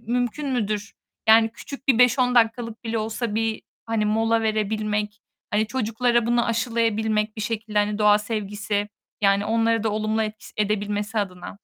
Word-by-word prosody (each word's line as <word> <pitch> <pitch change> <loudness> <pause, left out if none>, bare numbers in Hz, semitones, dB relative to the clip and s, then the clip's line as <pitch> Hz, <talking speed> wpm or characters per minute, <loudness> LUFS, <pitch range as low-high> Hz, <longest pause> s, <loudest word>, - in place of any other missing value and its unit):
mümkün 245 +5 -2
müdür? 215 -4 -2 0.4
Yani, 225 0 +7
küçük 275 +3 -10
bir 245 -3 +5
5-10 250 0 +4
dakikalık 230 0 +1
bile 225 0 -1
olsa 220 0 -3
bir, 225 0 -1 0.2
hani, 225 -2 0
mola 225 +1 +2
verebilmek, 215 -1 -1 0.3
hani, 215 +1 +1
çocuklara 235 0 0
bunu 240 0 +2
aşılayabilmek, 225 -2 0
bir 215 - -5
şekilde, 215 0 -2
hani, 205 0 +1
doğa 210 0 +5
sevgisi, 205 -1 -3 0.3
yani, 200 0 +3
onları 225 0 +1
da 220 - 0
olumlu 215 +1 0
et 215 0 -3
s - - -14
edebilmesi 210 +1 -1
adına. 185 -3 -4
220 Hz, 155 wpm, -24 LUFS, 210-230 Hz, 0.4 s, Yani